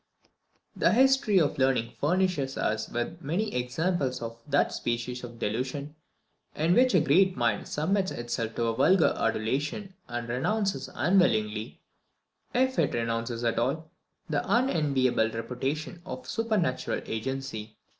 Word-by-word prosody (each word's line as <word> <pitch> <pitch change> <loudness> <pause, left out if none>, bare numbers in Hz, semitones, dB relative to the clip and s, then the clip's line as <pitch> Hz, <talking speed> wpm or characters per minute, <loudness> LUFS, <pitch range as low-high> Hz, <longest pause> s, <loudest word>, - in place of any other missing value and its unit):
The - - +3
history 265 -4 +4
of 145 -4 +1
learning 130 -3 +2
furnishes 165 -4 +1
us 110 0 -1
with 140 +9 -3
many 190 +9 -1
examples 135 +3 -1
of 115 0 -6
that 145 0 +2
species 120 +1 -3
of 120 -1 -8
delusion 130 +7 -3 0.6
in 160 +3 +2
which 250 0 +4
a - - +7
great 180 +5 +3
mind 115 -4 0
submits 190 +5 0
itself 120 -1 -3
to 115 -1 0
vulgar 165 +9 +4
adulation, 140 - -1
and 120 -1 -4
renounces 195 - -1
unwillingly, 115 - +1 0.7
if 260 +1 +1
it - - +2
renounces 115 0 -2
at 115 -1 +1
all, 155 +7 -1 0.4
the - - 0
unenviable 140 - +2
reputation 130 +9 -4
of 130 -6 -7
supernatural 210 - 0
agency. 110 -2 -4
135 Hz, 125 wpm, -28 LUFS, 120-180 Hz, 0.7 s, a